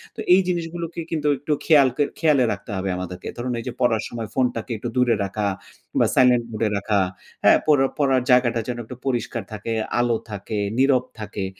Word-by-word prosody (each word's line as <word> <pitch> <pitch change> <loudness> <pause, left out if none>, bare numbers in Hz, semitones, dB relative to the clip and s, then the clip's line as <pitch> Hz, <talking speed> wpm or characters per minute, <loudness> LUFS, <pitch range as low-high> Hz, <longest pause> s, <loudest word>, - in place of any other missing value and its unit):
তো - - -12
এই 190 - +6
জিনিসগুলোকে 170 -1 -3
কিন্তু 155 -2 -1
একটু 150 +3 -1
খেয়াল 145 -5 +6
ক - - -17 0.2
খেয়ালে 150 -5 +4
রাখতে 110 - -9
হবে 95 0 -2
আমাদেরকে। 90 0 -6
ধরুন 125 +1 -3
এই - - -6
যে 125 - -2
পড়ার 115 -3 +2
সময় 115 -2 -5
ফোনটাকে 125 -2 -1
একটু 120 +3 -4
দূরে 125 -2 +4
রাখা। 100 +1 -2 0.5
বা - - +5
সাইলেন্ট 125 -2 +4
মুড 110 - -6
এ - - 0
রাখা। 100 0 +1 0.4
হ্যাঁ? - - +7
পড়া 140 -3 +4
পড়ার 135 -3 +3
জায়গাটা 120 -2 +3
যেন 125 - -3
একটু 125 - -9
পরিষ্কার 125 -4 -2
থাকে, 110 +2 -4 0.3
আলো 120 -2 +2
থাকে, 105 +1 -4 0.2
নীরব 130 -1 +4 0.2
থাকে। 105 -2 -4
125 Hz, 190 wpm, -23 LUFS, 110-135 Hz, 0.5 s, হ্যাঁ